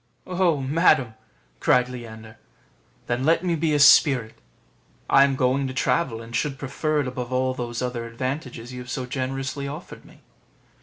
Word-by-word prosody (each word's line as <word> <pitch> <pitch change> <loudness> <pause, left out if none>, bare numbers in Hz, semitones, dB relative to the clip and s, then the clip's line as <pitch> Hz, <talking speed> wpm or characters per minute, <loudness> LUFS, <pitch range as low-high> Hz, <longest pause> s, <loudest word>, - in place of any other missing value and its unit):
"Oh, 180 -4 +1
madam!" 135 -3 +2 0.5
cried 125 0 +3
Leander, 110 -3 -10 0.7
"then 120 +2 -2
let 165 +4 +2
me 175 -2 +1
be 155 -1 0
a - - +2
spirit; 135 -5 +5 0.7
I 135 - +6
am 140 -1 +2
going 130 +1 +1
to 130 - -6
travel, 125 -5 0
and 115 +1 -8
should 140 -2 -1
prefer 150 +2 -1
it 135 - -3
above 125 -1 -5
all 130 0 0
those 120 -1 -4
other 120 -2 -3
advantages 130 0 -5
you 125 - -7
have 125 0 -9
so 130 0 -3
generously 135 +2 -4
offered 150 +5 -9
me." - - -19
130 Hz, 165 wpm, -24 LUFS, 125-145 Hz, 0.7 s, I